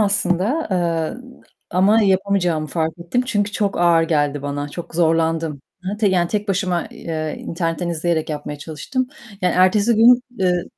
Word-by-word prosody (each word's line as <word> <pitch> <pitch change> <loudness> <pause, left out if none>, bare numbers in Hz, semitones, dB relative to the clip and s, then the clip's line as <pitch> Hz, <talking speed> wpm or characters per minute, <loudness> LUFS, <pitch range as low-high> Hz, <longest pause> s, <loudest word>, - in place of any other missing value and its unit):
aslında, 205 - +1
eee, 170 +3 -1 0.5
ama 200 +5 +4
yapamayacağımı 190 -5 +1
fark 160 0 -1
ettim 170 +9 -1
çünkü 205 -4 0
çok 205 -4 -1
ağır 170 -1 +4
geldi 145 -3 0
bana, 145 0 -3
çok 165 +2 -8
zorlandım. 165 -3 +1 0.2
Hı 185 - -3
hı, - - -4
te 210 -2 +3
yani 175 -2 +2
tek 210 0 -2
başıma, 180 -3 0
eee, 155 -2 -4
internetten 165 0 -3
izleyerek 165 -1 -1
yapmaya 150 -1 -5
çalıştım, 160 - -3 0.4
yani 180 - +2
ertesi 200 +5 +4
gün, 240 +3 +6 0.2
eee, 180 -2 +1
175 Hz, 155 wpm, -20 LUFS, 160-200 Hz, 0.5 s, gün